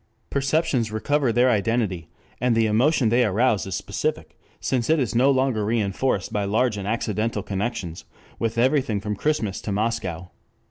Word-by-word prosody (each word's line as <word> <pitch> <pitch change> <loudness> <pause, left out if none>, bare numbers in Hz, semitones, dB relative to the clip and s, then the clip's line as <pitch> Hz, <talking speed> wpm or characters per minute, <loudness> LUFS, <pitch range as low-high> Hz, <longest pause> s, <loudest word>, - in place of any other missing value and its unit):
Perceptions 140 -4 +1
recover 135 +4 +1
their 125 +2 +4
identity, 105 -6 0 0.3
and 125 -1 +2
the 115 0 +3
emotion 120 +3 +3
they 120 +2 +3
arouse 110 0 +1
is 95 - -3
specific, - - -3 0.2
since 125 -3 -1
it 160 0 +4
is 125 -6 -1
no 125 +4 +4
longer 130 -5 +1
reinforced 105 0 -1
by 105 - 0
large 110 +3 +1
and 100 -1 -5
accidental 110 -1 -1
connections 95 -4 -4 0.4
with 115 0 -2
everything 130 -3 +2
from 105 +1 -3
Christmas 110 -6 -1
to 105 - -4
Moscow. 95 -5 -2
115 Hz, 155 wpm, -24 LUFS, 105-130 Hz, 0.4 s, their